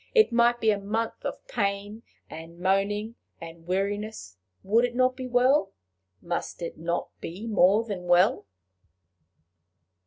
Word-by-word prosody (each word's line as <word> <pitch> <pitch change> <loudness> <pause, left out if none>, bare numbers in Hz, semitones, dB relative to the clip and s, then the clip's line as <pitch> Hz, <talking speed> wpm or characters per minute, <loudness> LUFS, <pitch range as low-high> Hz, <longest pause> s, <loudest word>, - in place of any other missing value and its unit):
it 440 - +5
might 240 0 +3
be 220 -2 +3
a 205 - -1
month 220 +3 -3
of - - -5
pain 205 - -2 0.3
and 165 +1 -10
moaning 200 +4 0 0.3
and 165 0 -11
weariness, 200 - -3 0.3
would 220 +5 +3
it 245 -1 -1
not 255 0 +2
be 255 -1 -6
well? 250 -4 +3 0.5
must 170 0 -4
it 170 - -5
not 170 +2 -3
be 185 +7 -7
more 210 -1 +4
than 200 -6 -6
well? 175 - +3
205 Hz, 135 wpm, -26 LUFS, 180-230 Hz, 0.5 s, it